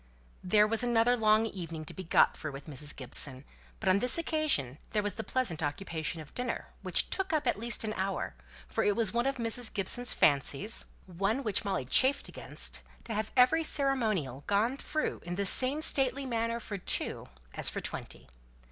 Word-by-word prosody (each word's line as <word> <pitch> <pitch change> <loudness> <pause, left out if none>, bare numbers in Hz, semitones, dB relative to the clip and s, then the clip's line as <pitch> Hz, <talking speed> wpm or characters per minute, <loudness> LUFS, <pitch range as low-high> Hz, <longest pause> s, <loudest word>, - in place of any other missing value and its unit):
There 210 +3 +4
was 225 +2 +1
another 240 0 +3
long 215 -1 +3
evening 165 -7 -6
to - - -8
be 190 - -7
got 165 - +3
through 150 -3 -6
with 135 +1 -9
Mrs. 150 -1 -5
Gibson; 130 0 -2 0.4
but - - -5
on 185 +1 +4
this 250 +8 +3
occasion 305 - -1
there 210 -2 +1
was 205 -1 -2
the 220 - -5
pleasant 225 -13 -2
occupation 160 +1 -4
of 155 -2 -11
dinner, 250 -1 -4
which - - +1
took 385 -1 -1
up 310 -2 0
at - - 0
least 235 0 0
an 215 -1 -3
hour; 195 -1 -3 0.3
for - - -1
it 205 - +2
was 225 -4 +4
one 240 +2 0
of 275 - -1
Mrs. 230 0 0
Gibson's 245 +5 +3
fancies 145 - +4 0.2
one 195 +8 -2
which 210 -5 -1
Molly 190 -11 -2
chafed 260 - +4
against - - -4 0.2
to 230 - -6
have 215 0 -3
every 255 +6 +5
ceremonial 220 - -1
gone 215 +6 +1
through 310 +2 -3
in 175 +1 -5
the 200 +2 -2
same 265 +9 +4
stately 270 -1 +2
manner 230 -1 -2
for 205 -3 -7
two - - 0 0.2
as - - +3
for - - -4
twenty. - - -7
215 Hz, 190 wpm, -30 LUFS, 175-245 Hz, 0.4 s, every